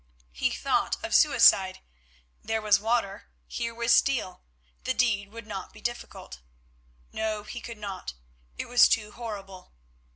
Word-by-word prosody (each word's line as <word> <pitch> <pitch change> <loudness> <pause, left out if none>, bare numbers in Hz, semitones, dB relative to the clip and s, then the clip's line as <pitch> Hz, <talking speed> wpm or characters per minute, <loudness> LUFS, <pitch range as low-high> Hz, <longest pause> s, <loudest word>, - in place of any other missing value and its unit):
He 60 - 0
thought - - 0
of - - -5
suicide; - - +5 0.6
there 225 0 -1
was 210 -1 +3
water, 220 -2 -1 0.2
here 230 -1 -4
was 235 0 0
steel, 240 -11 +1 0.4
the 260 - -1
deed 205 -5 +1
would 230 0 -10
not 200 -3 -7
be - - -14
difficult. 240 - -6 0.7
No, 215 -1 -3
he 235 +3 -8
could 235 -2 -8
not; 195 - -6 0.4
it - - -4
was 245 0 +6
too 210 -1 0
horrible. 195 -6 -9
220 Hz, 140 wpm, -27 LUFS, 200-235 Hz, 0.7 s, was